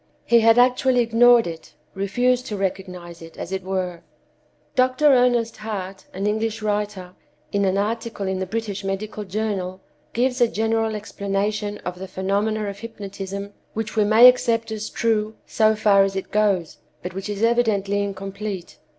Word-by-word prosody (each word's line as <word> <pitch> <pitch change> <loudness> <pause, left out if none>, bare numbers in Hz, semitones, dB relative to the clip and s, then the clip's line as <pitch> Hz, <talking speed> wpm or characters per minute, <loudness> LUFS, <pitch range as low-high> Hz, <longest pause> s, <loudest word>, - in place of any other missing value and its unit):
He 235 - +5
had 225 +1 +5
actually 250 0 +4
ignored 235 0 +5
it; 165 -1 -8 0.2
refused 245 +6 0
to 210 - -4
recognize 180 -3 -4
it, 165 0 -12
as 170 - -6
it 190 0 -2
were." 185 -2 -3 0.7
Dr. 255 +2 +2
Ernest 245 -4 +4
Hart, 195 -3 -6
an 195 +2 -4
English 220 +1 -1
writer, 205 -3 -2 0.4
in 200 0 +1
an 190 0 +1
article 220 0 -2
in 190 0 -1
the 190 - -3
British 210 -1 -4
Medical 205 +2 -4
Journal, 190 -2 -3 0.3
gives 250 +1 0
a 240 - +6
general 225 0 0
explanation 205 0 -2
of 180 0 -5
the 190 - -6
phenomena 205 +3 -1
of 200 0 -6
hypnotism 200 -2 -7 0.2
which 220 0 -3
we 215 - +4
may 220 +4 +8
accept 230 -3 +3
as 215 0 -4
true 220 -1 0
so 220 0 +2
far 205 -2 +4
as 195 0 -1
it 190 - -4
goes, 200 -6 +1 0.3
but 180 0 -5
which 195 +2 -5
is 205 +1 -3
evidently 215 -4 +2
incomplete. 195 -1 -5
210 Hz, 160 wpm, -22 LUFS, 195-225 Hz, 0.7 s, may